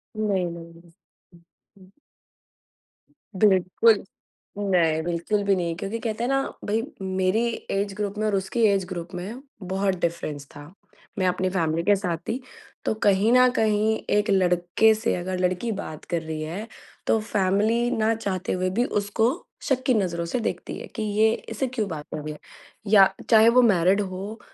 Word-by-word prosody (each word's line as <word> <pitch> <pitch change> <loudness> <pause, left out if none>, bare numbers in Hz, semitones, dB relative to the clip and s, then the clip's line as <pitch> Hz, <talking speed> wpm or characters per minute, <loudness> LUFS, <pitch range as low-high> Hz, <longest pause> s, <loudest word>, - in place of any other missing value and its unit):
नहीं, 205 -4 0
नहीं। 170 0 -11 0.5
हुँ, 170 - -19 0.4
हुँ। 185 -1 -18 1.5
बिल्कुल, 195 +2 +4 0.6
नहीं 170 -6 +2
बिल्कुल 175 +5 -1
भी 200 -1 +3
नहीं 170 -2 -2
क्योंकि 195 +6 -4
कहते 225 0 -3
हैं 245 - 0
ना, 270 0 0
भई 215 +2 0 0.2
मेरी 190 +4 +1 0.2
ऐज 200 0 -1
ग्रुप 205 0 -4
में 215 - -1
और 210 - +1
उसकी 195 +5 -1
ऐज 195 -2 +1
ग्रुप 175 -1 -6
में 200 +8 -6 0.2
बहुत 190 +1 -1
डिफ़रेंस 155 -4 -3
था। 145 +4 -11 0.5
मैं 185 - +2
अपनी 185 +1 0
फ़ैमिली 165 -3 0
के 205 +3 +4
साथ 180 -4 -2
थी, 245 +4 -2 0.4
तो - - +1
कहीं 205 +2 +4
न 250 0 +6
कहीं 220 0 +2 0.2
एक 210 - +1
लड़के 180 +3 +3
से 225 +2 -1
अगर 180 +1 -3
लड़की 185 +5 0
बात 160 -7 -6
कर 170 -1 -2
रही 160 -1 -5
है, 175 +8 -5 0.4
तो 225 - +3
फ़ैमिली 215 +3 +1
ना 220 -1 +2
चाहते 195 -4 -3
हुए 185 0 0
भी 230 +7 +1
उसको 210 +2 +1 0.3
शक 260 -2 0
की 255 - +4
नज़रों 175 -6 0
से 170 +9 -2
देखती 225 - -4
है, - - -8
कि 220 - -5
ये 215 +1 +3 0.2
इससे 265 - -2
क्यों 240 -4 -2
बात 150 -3 -6
कर 155 - -4
रही 155 0 -5
है। 150 - -13 0.5
या 195 -2 +7 0.2
चाहे 220 0 +7
वो 250 +2 +5
मैरिड 195 -3 +4
हो, 195 +3 -6
195 Hz, 175 wpm, -24 LUFS, 180-220 Hz, 1.5 s, या